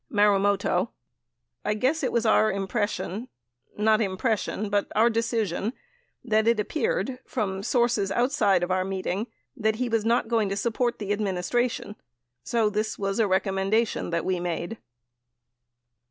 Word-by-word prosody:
Marumoto. 205 -1 +2 0.7
I 210 - 0
guess 265 +9 +1
it 255 - 0
was 235 -1 +1
our 215 0 +4
impression 205 +2 -2 0.2
— - - -57 0.2
not 215 +1 +3
impression, 210 +1 -1
but 205 -1 0
our 230 +2 +5
decision, 225 -2 -1 0.5
that 220 -2 +2
it 230 -2 +3
appeared, 310 - -1
from 195 -5 -2
sources 235 -3 +1
outside 240 -5 +2
of 175 - -1
our 185 0 +2
meeting, 195 +3 -2 0.3
that 220 -4 +1
he 245 +2 -2
was 225 -2 +1
not 230 0 +2
going 225 -3 +1
to 195 - -2
support 235 +3 0
the 205 -1 -2
administration 205 +3 -1 0.5
so 230 - +1
this 215 +1 -1
was 195 +1 -2
a 220 - +4
recommendation 195 +3 +1
that 170 -1 -1
we 185 -1 0
made. 175 +5 -3
215 Hz, 145 wpm, -26 LUFS, 195-235 Hz, 0.7 s, our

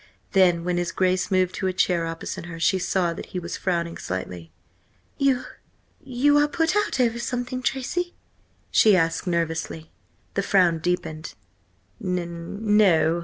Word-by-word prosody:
Then, 180 -3 +4
when 180 0 -1
his 175 -1 -1
Grace 185 -1 +1
moved 185 -1 +2
to 190 - -1
a 185 - 0
chair 175 -2 +1
opposite 165 +1 -6
her, 165 -1 -8
she 185 +4 +2
saw 180 -1 0
that - - -8
he - - 0
was 170 0 -5
frowning 170 -3 -2
slightly. 90 -2 -5 0.7
"You–you 275 +1 0
are 295 - +4
put 325 +4 0
out 415 -9 0
over 235 -2 +2
something, 250 +1 -3
Tracy?" 275 +8 -2 0.6
she 215 -3 +6
asked 165 +2 0
nervously. 165 -2 -2 0.4
The 200 - 0
frown 180 -4 +3
deepened. 160 -2 -3 0.7
"N 180 +3 -1
no. 165 -5 +4
180 Hz, 145 wpm, -24 LUFS, 170-235 Hz, 0.7 s, she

